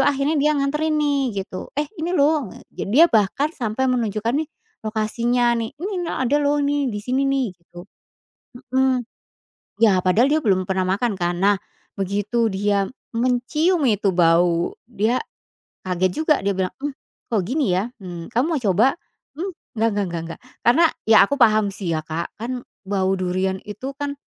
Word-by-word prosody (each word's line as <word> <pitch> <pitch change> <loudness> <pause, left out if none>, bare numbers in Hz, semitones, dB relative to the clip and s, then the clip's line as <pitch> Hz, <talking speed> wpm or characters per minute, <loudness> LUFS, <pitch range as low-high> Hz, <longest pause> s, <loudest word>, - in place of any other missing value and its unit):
akhirnya 285 +2 +2
dia 300 +1 +3
nganterin 300 +3 0
nih 275 -9 0
gitu, 185 - -8
eh, 295 - +1 0.2
ini 330 - -2
loh 290 -5 +2
nge - - -13 0.2
dia 280 +10 +7
bahkan 275 - +2
sampai 240 0 -2
menunjukkan 230 -3 0
nih 300 +3 -1 0.3
lokasinya 235 +3 0
nih, 225 - -3
"ini 385 +7 -4 0.2
nih - - -2
ada 275 +4 +2
loh 290 0 +2
nih 285 -1 +1
disini 255 +6 -1
nih" 265 -7 0
gitu, 175 0 -14 0.9
mhm, 265 -1 +3 0.8
ya 195 -5 +4
padahal 205 +8 +4
dia 305 +2 +2
belum 185 -4 +2
pernah 190 -1 0 0.2
makan 240 -3 0
kan 175 -2 -2
nah 200 +2 +4 0.4
begitu 205 +4 0
dia 200 0 0 0.2
mencium 255 +8 +1
itu 205 -4 +2
bau 170 0 +3 0.2
dia, 225 +3 0 0.6
kaget 185 0 0
juga 305 -1 +4
dia 195 0 -1
bilang, 185 -1 -1
"mmm, 285 +1 -3 0.3
kok 220 -5 +1
gini 245 - 0
ya?" 210 +6 -1
Mmm, 175 0 -8
"kamu 245 +5 +2
mau - - 0
coba?" 205 +5 +4 0.5
"Mmm, 370 +5 -4 0.2
nggak 225 +1 +2
nggak 205 -1 -1
nggak 170 -1 -4
nggak" 165 0 -8 0.2
karena 285 +9 +5 0.2
ya 220 -1 +5
aku 285 - 0
paham 215 -5 +4
sih 195 -3 -4
ya 160 - 0
Kak 165 +2 -4
kan 245 +2 -4 0.2
bau 190 -1 +1
durian 185 +1 -1
itu 235 +6 -5
kan, 285 -1 -3
225 Hz, 170 wpm, -22 LUFS, 190-275 Hz, 0.9 s, dia